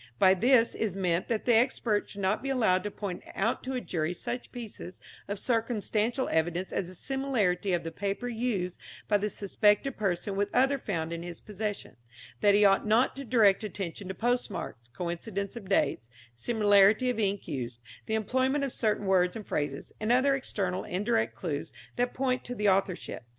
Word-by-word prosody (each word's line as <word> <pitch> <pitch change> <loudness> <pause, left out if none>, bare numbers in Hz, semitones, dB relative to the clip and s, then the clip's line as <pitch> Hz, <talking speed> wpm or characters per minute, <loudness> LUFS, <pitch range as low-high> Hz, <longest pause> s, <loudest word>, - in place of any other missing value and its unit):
By 185 +8 +6
this 230 +4 +4
is 210 -4 -2
meant 180 -2 0
that 225 -2 -1
the 240 - +4
expert 225 -3 +2
should 200 - -7
not 190 +3 +1
be 275 - -4
allowed 220 -9 +3
to - - -1
point 200 -3 -5
out 220 +5 0
to 265 - -4
a 250 - -2
jury 165 -3 -2
such 245 +7 -5
pieces 220 -6 -8 0.3
of 205 - -3
circumstantial 230 +2 0
evidence 175 +3 0
as 185 - -1
the 185 - -9
similarity 215 -7 0
of 175 -1 0
the 165 - -5
paper 200 +6 -3
used 220 -7 -2 0.3
by 205 -1 +3
the 210 +1 -1
suspected 210 +6 +1
person 195 -1 -1
with 205 +1 0
other 270 +2 +3
found 165 -7 -3
in 170 - -4
his 175 -1 -7
possession; 210 - -5 0.4
that 205 -1 +5
he 205 0 +5
ought 195 +2 +4
not 225 +4 +3
to 275 - -6
direct 220 -5 +4
attention 195 -2 -5
to 190 - -5
postmarks, 225 - -2
coincidence 180 - -4
of 205 -5 -9
dates, 115 - +1 0.2
similarity 210 - +4
of 240 - -4
ink 200 -2 -1
used, 120 -3 -4 0.3
the 220 - 0
employment 260 +6 +1
of 275 - -1
certain 215 -3 0
words 180 -2 +3
and 220 -2 -6
phrases, 145 -2 -3
and 215 +2 0
other 260 +3 +4
external 195 -8 -2
and - - -6
indirect 220 +3 0
clues 150 -5 -4 0.3
that 245 0 0
point 255 -1 0
to 245 - -5
the 210 -2 0
authorship. 190 - 0
205 Hz, 185 wpm, -29 LUFS, 185-240 Hz, 0.4 s, By